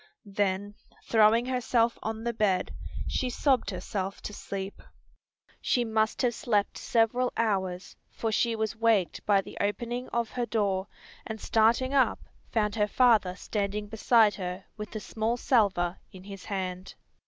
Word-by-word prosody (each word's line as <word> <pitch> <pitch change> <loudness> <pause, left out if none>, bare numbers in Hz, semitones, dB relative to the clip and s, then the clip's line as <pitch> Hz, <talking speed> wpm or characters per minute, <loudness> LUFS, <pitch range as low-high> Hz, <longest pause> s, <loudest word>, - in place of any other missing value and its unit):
Then 200 0 -1 0.3
throwing 225 +1 +4
herself 240 -2 +1
on 220 0 -4
the 235 0 -1
bed 200 -5 +1 0.3
she 255 - -1
sobbed 255 -3 +1
herself 195 0 -4
to 210 - -6
sleep. 195 -1 -6 0.8
She 245 -1 +1
must 220 +1 0
have 240 -1 +2
slept 210 -3 0
several 240 +2 +2
hours, 190 -5 -1
for 225 - -3
she 230 +1 +1
was 220 +1 -2
waked 225 -5 +1
by 200 -2 +5
the - - -10
opening 240 +4 -2
of 235 -2 -1
her 245 -1 -2
door, 200 -4 0 0.4
and 220 -1 -5
starting 230 +6 +2
up 270 -2 +3 0.3
found 210 -2 0
her 210 -1 +2
father 215 -5 +3
standing 205 +1 -2
beside 220 0 +4
her 180 0 -5
with 210 +1 -8
a - - -2
small 225 +3 -2
salver 195 -8 +2
in 185 -1 -12
his 195 -1 -9
hand. 185 -2 -4
215 Hz, 150 wpm, -28 LUFS, 195-235 Hz, 0.8 s, by